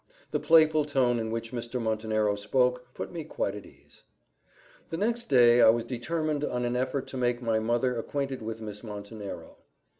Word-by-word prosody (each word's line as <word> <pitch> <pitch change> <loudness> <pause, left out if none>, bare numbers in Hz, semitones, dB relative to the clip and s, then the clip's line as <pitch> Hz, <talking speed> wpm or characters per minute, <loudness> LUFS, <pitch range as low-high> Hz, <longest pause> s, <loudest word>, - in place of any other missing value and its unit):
The - - 0
playful 155 -2 +5
tone 130 -5 +1
in 110 -1 -3
which 115 0 -4
Mr. 120 0 -4
Montenero 110 -2 0
spoke, 125 +4 0
put - - -5
me 170 -2 -5
quite 125 -9 -2
at 105 - -8
my - - -13
ease. - - -20 0.9
The 165 - -3
next 235 +5 0
day 120 -3 +6
I - - +8
was 115 +1 +2
determined 150 +5 -2
on 125 -4 -1
an 120 0 -1
effort 130 +2 -1
to 130 - -6
make 120 -1 +1
my 115 -2 0
mother 120 +3 0
acquainted 135 +2 -3
with 110 0 -5
Miss 105 0 -7
Montenero. 105 -1 -8
120 Hz, 185 wpm, -28 LUFS, 110-135 Hz, 0.9 s, I